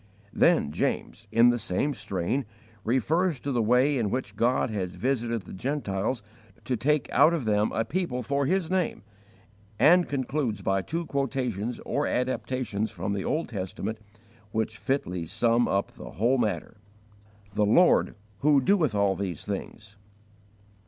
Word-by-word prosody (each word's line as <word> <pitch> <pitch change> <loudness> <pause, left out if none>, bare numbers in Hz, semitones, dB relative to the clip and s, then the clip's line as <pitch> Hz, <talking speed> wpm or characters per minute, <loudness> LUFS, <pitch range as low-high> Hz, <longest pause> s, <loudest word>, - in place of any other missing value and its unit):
Then 70 - +3
James, 110 +7 -2
in 120 +1 +6
the 120 - -1
same 110 +9 -1
strain, 100 +4 -2 0.4
refers 150 - +1
to 140 - -3
the 120 -3 +1
way 125 +5 +3
in 110 -3 0
which 130 +5 -3
God 120 0 +1
had 95 -4 -2
visited 115 0 -1
the - - -11
Gentiles 115 -1 -2 0.4
to 130 - 0
take 145 +3 +1
out 155 +6 +5
of 145 -8 -3
them 105 0 +2
a 115 - -1
people 160 -8 -2
for 140 +3 0
His 185 -1 0
name; 185 - 0 0.7
and 175 - +5
concludes 130 -6 -2
by 95 +1 +1
two 165 - -3
quotations 125 -6 -2
or 145 +1 0
adaptations 125 -4 -1
from 95 +4 -3
the 100 -1 -2
Old 160 -2 -1
Testament, 105 +1 -4 0.5
which 110 0 -2
fitly 90 - -2
sum 115 +6 +2
up 100 0 0
the - - -11
whole 120 +6 +2
matter: 110 0 -2 0.8
"The 105 0 +2
Lord 175 - +4 0.2
who 145 -1 +4
doeth 155 - +2
all 100 -1 +2
these 95 -6 -4
things." 105 +1 -6
120 Hz, 150 wpm, -27 LUFS, 105-140 Hz, 0.8 s, in